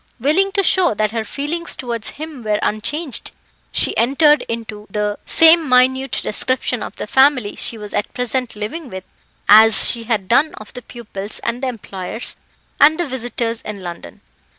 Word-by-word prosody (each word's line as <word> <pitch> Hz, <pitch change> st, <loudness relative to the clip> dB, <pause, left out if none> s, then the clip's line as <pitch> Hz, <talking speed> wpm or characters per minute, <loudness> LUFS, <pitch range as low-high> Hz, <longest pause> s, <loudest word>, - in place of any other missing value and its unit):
Willing 330 Hz, +10 st, +1 dB
to 400 Hz, -2 st, +1 dB
show 365 Hz, -, +2 dB
that 215 Hz, 0 st, 0 dB
her 225 Hz, -1 st, -2 dB
feelings 295 Hz, +8 st, -4 dB
towards 235 Hz, -3 st, -4 dB
him 305 Hz, -4 st, -8 dB
were 210 Hz, -1 st, 0 dB
unchanged, 250 Hz, +8 st, -2 dB, 0.4 s
she -, -, 0 dB
entered 295 Hz, +5 st, +3 dB
into 220 Hz, -2 st, -6 dB
the 210 Hz, +1 st, -2 dB
same 325 Hz, -2 st, +6 dB
minute 260 Hz, +1 st, +2 dB
description 250 Hz, +1 st, -1 dB
of -, -, -7 dB
the -, -, -5 dB
family 265 Hz, -2 st, +2 dB
she 230 Hz, -, -1 dB
was 210 Hz, -1 st, -9 dB
at 205 Hz, -, -2 dB
present 250 Hz, -1 st, -3 dB
living 245 Hz, +9 st, -6 dB
with 190 Hz, -2 st, -8 dB, 0.4 s
as 220 Hz, 0 st, +7 dB
she 230 Hz, -1 st, -7 dB
had 215 Hz, -5 st, -1 dB
done 285 Hz, +8 st, +2 dB
of 215 Hz, -, -12 dB
the 250 Hz, -, -8 dB
pupils, 215 Hz, -4 st, -4 dB
and 235 Hz, +2 st, -2 dB
the 265 Hz, -, -2 dB
employers, 215 Hz, -2 st, -4 dB, 0.4 s
and 315 Hz, +3 st, +5 dB
the 345 Hz, -, 0 dB
visitors 240 Hz, -3 st, -4 dB
in 210 Hz, -2 st, -7 dB
London. 175 Hz, -2 st, -9 dB
240 Hz, 170 wpm, -18 LUFS, 215-280 Hz, 0.4 s, as